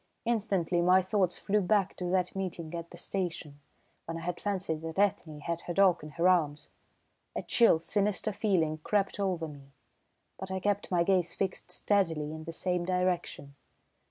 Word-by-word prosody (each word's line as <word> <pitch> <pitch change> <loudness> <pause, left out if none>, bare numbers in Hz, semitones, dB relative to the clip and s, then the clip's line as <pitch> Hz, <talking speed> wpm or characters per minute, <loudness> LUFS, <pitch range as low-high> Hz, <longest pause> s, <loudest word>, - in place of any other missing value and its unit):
Instantly 195 -7 +1
my 185 +2 +5
thoughts 190 -2 +1
flew 210 +1 +1
back 195 0 +2
to 180 - -4
that 180 0 0
meeting 175 -4 -4
at 170 0 -5
the 175 - -12
station, 170 -6 -3 0.5
when 165 0 -4
I - - -6
had 175 +1 -4
fancied 190 -6 -2
that 160 +1 -6
Ethne 175 -7 0
had 170 +3 -3
her 175 - -3
dog 190 -3 +5
in 150 - -7
her 170 +2 +4
arms. 155 -5 +1 0.6
A - - -2
chill, 230 -8 +5
sinister 205 +5 0
feeling 165 -7 +1
crept 200 +5 0
over 180 -5 -1
me, 140 -2 -13 0.7
but 190 - -6
I 190 0 -2
kept 205 +1 -1
my 175 -2 +3
gaze 180 -2 +1
fixed 190 -2 -3
steadily 165 -5 +1
in 160 0 -8
the 165 - -5
same 180 +1 -1
direction. 180 -6 -1
180 Hz, 175 wpm, -30 LUFS, 165-195 Hz, 0.7 s, my